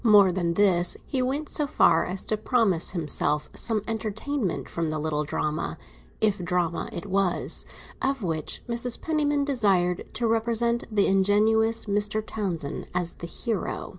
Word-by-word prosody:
More 205 -4 +6
than 170 -2 -1
this, 180 -4 +3
he 265 -3 -1
went 275 +4 -1
so 295 0 0
far 165 -10 +3
as 185 +1 -2
to 215 - +1
promise 215 -6 +1
himself 150 -3 0
some 220 -3 0
entertainment 225 +1 -2
from 165 -2 -2
the 155 - -2
little 150 0 -1
drama—if 150 - -3
drama 175 -2 -1
it 170 - -6
was—of 195 +6 -2
which 160 -4 -3
Mrs. 235 0 +1
Penniman 295 -3 0
desired 195 -10 +1
to 235 +2 -1
represent 235 +1 +1
the 205 -2 +3
ingenious 215 +4 +3
Mr. 210 +1 0
Townsend 170 -10 -4
as 180 -2 0
the 170 - -4
hero. 220 +2 -3
205 Hz, 140 wpm, -26 LUFS, 175-230 Hz, -, More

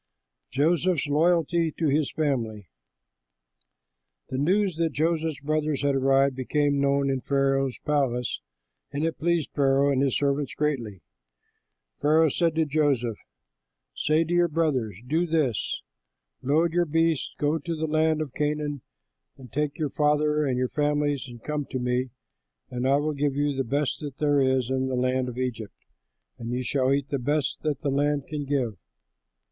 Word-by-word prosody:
JOSEPH'S 165 +4 +1
LOYALTY 165 +1 +2
TO 165 - +1
HIS 145 +1 +1
FAMILY 115 - -2 1.6
The 130 - -3
news 185 +3 +1
that 165 -3 0
Joseph's 160 -1 0
brothers 150 -1 -1
had 140 -1 +2
arrived 135 0 +3
became 140 +2 0
known 140 0 +2
in 135 -1 -1
Pharaoh's 135 -1 +1
palace; 130 -5 0 0.5
and 145 +3 -1
it 165 - -2
pleased 170 -2 0
Pharaoh 140 0 +3
and 135 -1 +1
his 135 -3 +2
servants 140 -1 -1
greatly. 120 - -2 1.0
Pharaoh 155 +2 +4
said 165 +2 +1
to 160 0 +2
Joseph, 140 -7 0 0.8
"Say 155 +2 +2
to 165 +2 -3
your 175 0 +4
brothers, 145 - 0
'Do 160 +7 +1
this: 155 -9 0 0.6
load 160 +5 +2
your 175 0 +2
beasts, 165 -1 0
go 150 +2 +1
to 165 +3 -4
the 160 0 -2
land 155 0 +2
of 140 -4 -10
Canaan, 150 -1 -2 0.6
and 125 -4 -14
take 150 0 -1
your 150 -4 -2
father 150 0 +2
and 125 -2 0
your 125 0 0
families 145 -2 0
and 120 -2 -12
come 150 -1 -2
to - - -3
me, 125 +1 -1 0.6
and 125 +1 -1
I 135 - +4
will 150 +2 0
give 140 -1 -1
you 145 0 0
the 135 - 0
best 140 +4 -1
there 145 -2 +2
is 130 -1 +1
in 130 0 0
the 130 - -1
land 125 0 0
of 125 - -8
Egypt, 120 -5 -4 0.6
and 115 - -5
you 125 +1 -2
shall 130 +1 +1
eat 140 0 0
the 140 - -1
best 145 +2 -1
that 150 -3 -2
the 140 - -1
land 145 0 +1
can 150 -2 -4
give. 130 -7 -1
145 Hz, 165 wpm, -26 LUFS, 130-155 Hz, 1.6 s, Pharaoh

